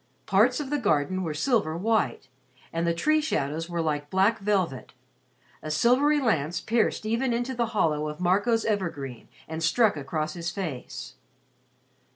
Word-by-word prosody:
Parts 225 +7 +3
of 285 -2 -5
the 295 - +1
garden 185 - +1
were 160 -4 -3
silver 165 - +1
white, 220 -7 0 0.5
and 165 +1 0
the 170 - +2
tree 310 - +2
shadows 160 - -2
were 170 -1 -1
like 145 -2 -2
black 195 +6 +2
velvet. 190 -12 -1 0.7
A 155 - -6
silvery 255 - +3
lance 170 - 0
pierced 225 -1 0
even 235 +3 0
into 245 +2 -1
the 235 -2 0
hollow 155 -4 +1
of 150 - -8
Marco's 205 +6 +2
evergreen 165 - -3 0.2
and 160 +1 -5
struck 205 +5 +3
across 155 +2 -3
his 170 0 -4
face. 170 -10 -6
185 Hz, 155 wpm, -26 LUFS, 155-230 Hz, 0.7 s, Parts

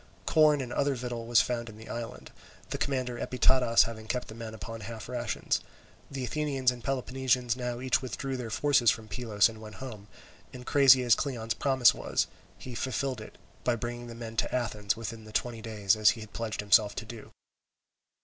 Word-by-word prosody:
Corn 150 -2 +5
and 125 -2 -5
other 140 -1 +1
victual 120 -2 -5
was 115 -3 +6
found 120 -1 -3
in 105 - -12
the 110 - -12
island; 115 -1 -6 0.4
the - - -2
commander 130 -3 -1
Epitadas 125 -2 +4
having 110 -1 -7
kept 125 +2 -2
the - - -7
men 110 -1 -7
upon 110 +3 -7
half 110 +1 -7
rations. 120 -2 -1 0.5
The 135 -2 -4
Athenians 135 -1 +1
and 120 -2 -9
Peloponnesians 130 -2 0
now 125 -1 -3
each 130 +1 +1
withdrew 130 +2 -4
their 125 -3 -5
forces 140 -1 +3
from 110 +2 -1
Pylos, 105 -1 +2
and 110 -1 -10
went 110 -1 -10
home, 110 -6 -8 0.5
and 125 -1 -9
crazy 135 -2 +6
as 120 -2 +5
Cleon's 115 -5 -1
promise 130 -3 +4
was, - - 0 0.3
he 130 - -8
fulfilled 130 0 -2
it, 110 - -11 0.3
by 120 - +2
bringing 120 +1 -5
the 115 - -8
men 115 -1 -7
to - - +1
Athens 105 -4 -1
within 115 0 -6
the 110 - -11
twenty 115 +1 -2
days 110 -2 +1
as 110 -1 +5
he 115 - -1
had 110 - -11
pledged 115 -2 -3
himself 105 0 +4
to - - -5
do. 110 0 -10
120 Hz, 195 wpm, -29 LUFS, 110-130 Hz, 0.5 s, was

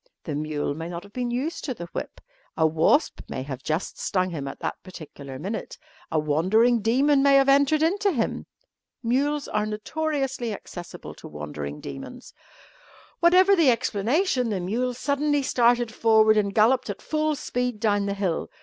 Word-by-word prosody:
The 155 - -4
mule 150 -1 -2
may 165 +3 -6
not 170 0 -6
have 200 0 -16
been 250 -1 -2
used 265 +8 -3
to 260 -4 -3
the 175 - -7
whip; - - -5 0.4
a 160 - +3
wasp 160 - +2
may 130 - -4
have 135 -2 -6
just 155 +5 -3
stung 185 -1 0
him 145 -4 -4
at - - -6
that - - -4
particular 145 -7 -10
minute; 200 +10 -5 0.3
a 160 - -1
wandering 190 +11 +3
demon 275 +6 +3
may 280 0 +5
have 275 0 +5
entered 285 +3 +4
into 400 +5 +2
him. 240 -9 -2 0.6
Mules 280 +5 0
are 210 0 -1
notoriously 270 +1 -2
accessible 175 -3 -9
to - - -12
wandering 75 -1 -6
demons. 250 - -9 0.9
Whatever 370 +3 +6
the 330 -7 +4
explanation, 250 - +1
the 200 -3 -1
mule 240 +8 -1
suddenly 285 +2 0
started 240 -2 +2
forward 220 -1 +4
and 200 -2 0
galloped 230 +3 +3
at 200 - -4
full 310 0 -1
speed 245 -5 -3
down 205 -2 +1
the 200 - -1
hill. 190 -5 -2
225 Hz, 170 wpm, -25 LUFS, 175-275 Hz, 0.9 s, Whatever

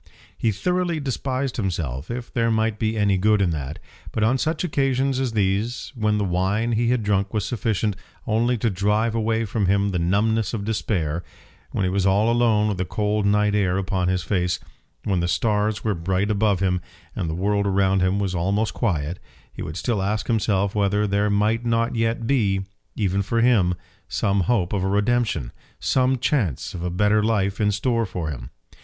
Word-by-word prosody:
He 115 - +1
thoroughly 180 - -1
despised 135 -1 -2
himself, 80 - -3
if 120 0 -5
there 115 -1 +1
might 110 -1 0
be 110 0 0
any 100 -2 +2
good 105 +2 +3
in 95 -3 +2
that! 75 -1 -4 0.3
But 110 - -1
on 125 +4 +2
such 160 +4 -1
occasions 135 -4 +1
as 130 -4 -1
these, 105 +3 -1
when 110 -4 0
the 105 - 0
wine 95 +6 0
he 115 +1 +1
had 125 -2 +1
drunk 100 0 0
was 105 -2 0
sufficient 110 -2 -1 0.3
only 120 +2 +1
to 115 0 0
drive 105 +4 +1
away 115 0 0
from 100 -1 -1
him 100 +1 +2
the 90 -3 -1
numbness 105 +5 +1
of 100 -2 -4
despair, 90 -7 -1 0.5
when - - -2
he 90 - +1
was 95 0 +1
all 105 +4 +3
alone 115 -3 +3
with 100 -4 -2
the - - +1
cold 105 +1 0
night 105 0 +3
air 95 -3 +1
upon 95 -1 -1
his 90 -2 0
face, 90 -1 0 0.4
when 95 -3 0
the 85 - 0
stars 105 +3 0
were 110 - +1
bright 95 +4 0
above 100 -2 +1
him 90 -2 +1 0.3
and 85 - -2
the 80 - -2
world 100 +3 +1
around 95 0 +2
him 95 +2 +2
was 100 -2 -1
almost 100 +5 0
quiet, 85 - -1 0.3
he - - -8
would 80 - -5
still 115 -2 -1
ask 100 0 -1
himself 100 -3 +1
whether 105 0 +1
there 100 +1 +1
might 105 +3 +1
not 115 0 0
yet 115 0 0
be, 105 -7 +2 0.3
even 100 -2 0
for 115 +4 -1
him, 105 -8 +3 0.3
some 100 0 +1
hope 95 -1 +1
of 100 -2 0
a 95 - 0
redemption, 105 - +1 0.3
some 130 0 +2
chance 120 - -1
of 90 - -6
a 90 - -1
better 105 +4 +2
life 105 -2 0
in 105 0 +3
store 115 +2 0
for 90 -4 -4
him. - - -7
105 Hz, 195 wpm, -23 LUFS, 95-115 Hz, 0.5 s, good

